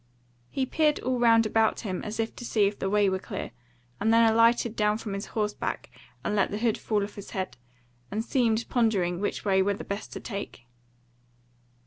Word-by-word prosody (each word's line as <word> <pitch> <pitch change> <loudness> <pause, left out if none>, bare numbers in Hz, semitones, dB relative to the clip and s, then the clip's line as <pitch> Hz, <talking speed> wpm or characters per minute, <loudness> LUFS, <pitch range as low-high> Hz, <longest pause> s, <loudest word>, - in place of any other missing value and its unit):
He 265 - -1
peered 300 +2 +2
all 255 0 -1
round 230 -1 +5
about 220 0 +2
him 190 -5 -3
as 215 +1 -5
if 225 0 -1
to - - -7
see 215 -3 +2
if 200 +1 -1
the 195 - -1
way 205 0 +3
were 190 0 0
clear, 195 0 -6 0.5
and 220 +2 +2
then 230 0 +6
alighted 230 0 +3
down 210 0 +2
from 215 -3 -5
horseback 210 -1 -3 0.3
and 210 - 0
let 200 - +2
the 205 - -3
hood 225 0 +1
fall 210 -2 0
off 205 - -6
his 200 - -9
head, 185 -9 -3 0.5
and 220 +3 -3
seemed 230 -4 +1
pondering 195 -8 +1
which 205 - -3
way 190 -1 +3
were 200 +1 +1
the - - -7
best 200 +2 -5
to - - -5
take. 200 - -7
215 Hz, 195 wpm, -27 LUFS, 200-230 Hz, 0.5 s, then